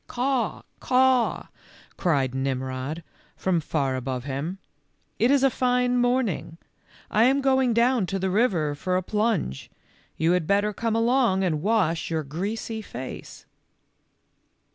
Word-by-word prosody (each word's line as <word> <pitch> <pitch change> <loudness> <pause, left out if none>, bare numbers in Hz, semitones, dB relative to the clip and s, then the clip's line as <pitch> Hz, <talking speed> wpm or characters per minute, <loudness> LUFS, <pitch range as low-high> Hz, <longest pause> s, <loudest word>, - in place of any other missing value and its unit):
"Caw, 250 -2 -1 0.2
caw," 255 -1 +2 0.5
cried 140 -8 0
Nimrod, 130 +3 -3 0.3
from 185 -3 +1
far 140 -4 -1
above 130 -1 -3
him. 145 +7 -4 0.3
" - - -44
It 235 - +3
is 275 -1 +4
a 270 - +4
fine 250 0 +1
morning. 245 -9 0 0.5
I 220 +2 +4
am 270 +2 +3
going 265 -2 +2
down 235 -2 +2
to 195 - -2
the 190 0 -1
river 185 -9 +1
for 180 +5 -1
a 185 - -2
plunge, 210 - -1 0.5
you 160 +2 +2
had 180 -3 +1
better 205 +1 +2
come 225 +2 -1
along 230 -4 +2
and 155 -5 0
wash 190 -5 +1
your 160 -1 -1
greasy 205 +9 -4
face." 130 - -8
195 Hz, 140 wpm, -25 LUFS, 155-245 Hz, 0.5 s, is